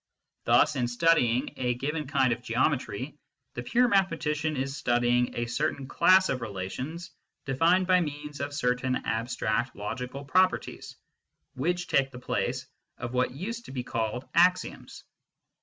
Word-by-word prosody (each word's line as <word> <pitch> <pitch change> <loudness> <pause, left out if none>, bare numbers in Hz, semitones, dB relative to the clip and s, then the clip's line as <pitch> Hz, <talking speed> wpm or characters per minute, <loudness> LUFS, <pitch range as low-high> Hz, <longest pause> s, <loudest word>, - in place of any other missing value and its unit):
Thus - - +4
in 125 -2 0
studying 125 -2 +2
a 125 -1 0
given 150 +3 -3
kind 135 -3 +2
of 115 - -7
geometry 130 +2 -1 0.3
the 120 - -4
pure 245 - +3
mathematician 160 - +1
is 135 +1 -2
studying 120 -1 +1
a 120 - -1
certain 130 +3 -2
class 185 +5 +5
of 130 - -1
relations 125 - -5 0.3
defined 165 +7 +3
by 180 0 +4
means 150 -2 -5
of 140 +1 -3
certain 125 -2 0
abstract 115 +1 -1
logical 125 +6 -5
properties 185 +6 0 0.6
which 175 +6 -1
take 140 -5 +2
the 130 - -11
place 125 - -2 0.3
of 120 +1 -5
what 125 0 +2
used 215 - -6
to - - -10
be 130 -2 -4
called 115 +1 -3
axioms. 180 +2 +1
135 Hz, 140 wpm, -28 LUFS, 125-165 Hz, 0.6 s, class